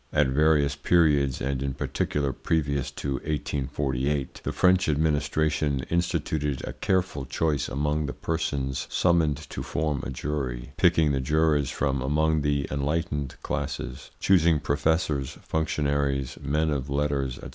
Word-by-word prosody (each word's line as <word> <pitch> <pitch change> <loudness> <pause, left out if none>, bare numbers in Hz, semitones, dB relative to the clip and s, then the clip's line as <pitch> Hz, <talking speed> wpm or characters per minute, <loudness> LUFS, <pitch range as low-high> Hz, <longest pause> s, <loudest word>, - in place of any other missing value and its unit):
At 75 -3 +3
various 75 0 +3
periods, 70 -3 +3
and 65 0 -1
in 70 -1 -2
particular 70 +1 -1
previous 70 -4 -1
to 70 -1 -3
1848, 70 -1 -2
the - - -2
French 90 -1 +3
administration 75 -1 +1
instituted 80 -4 -1
a - - -5
careful 95 -7 0
choice 75 +2 0
among 75 +2 0
the 70 - -4
persons 70 -5 -2
summoned 85 -5 +2
to - - -4
form 75 -4 -1
a - - -4
jury, 65 -2 -4
picking 80 -3 +4
the 70 -1 0
jurors 75 0 +2
from 65 -1 -1
among 75 +3 +2
the 70 -1 0
enlightened 75 -1 -1
classes; - - -4
choosing 85 -5 +4
professors, 70 -1 0
functionaries, 70 -4 0
men 75 +2 +1
of 70 -1 -2
letters, 70 -2 0
&c. - - -8
75 Hz, 135 wpm, -26 LUFS, 70-80 Hz, -, picking